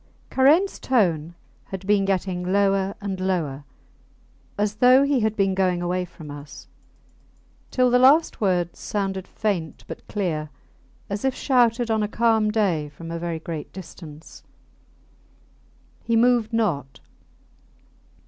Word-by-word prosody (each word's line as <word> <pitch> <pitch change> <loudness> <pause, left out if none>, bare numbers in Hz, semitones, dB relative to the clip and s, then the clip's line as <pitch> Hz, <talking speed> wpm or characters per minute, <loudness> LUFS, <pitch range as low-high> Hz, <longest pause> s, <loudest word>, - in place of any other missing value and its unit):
V - - -34 0.3
Karains 310 +9 +4
tone 175 - +1 0.3
had 190 0 -7
been 200 -1 +2
getting 185 -2 -1
lower 195 0 +2
and 195 -2 -4
lower, 160 -7 -2 0.9
as 210 0 -1
though 255 +3 +6
he 280 -2 +2
had 220 -1 0
been 195 -2 +1
going 185 -2 +1
away 180 +1 -1
from 160 -4 -11
us, 145 0 -11 1.0
till 255 -1 +2
the 250 - +5
last 280 +4 +4
words 180 -4 0
sounded 195 -2 -3
faint 185 -7 -3
but - - -9
clear, 160 -7 -2 0.6
as 200 +1 -4
if 265 -1 0
shouted 240 -3 +2
on 220 -1 +1
a 210 - 0
calm 220 -1 +2
day 185 -9 0
from 165 +3 -10
a 170 - -4
very 170 -1 -3
great 160 -1 -7
distance. 165 -4 -11 1.6
He 230 - 0
moved 235 -1 +3
not. 170 - -1
195 Hz, 135 wpm, -23 LUFS, 175-225 Hz, 1.6 s, though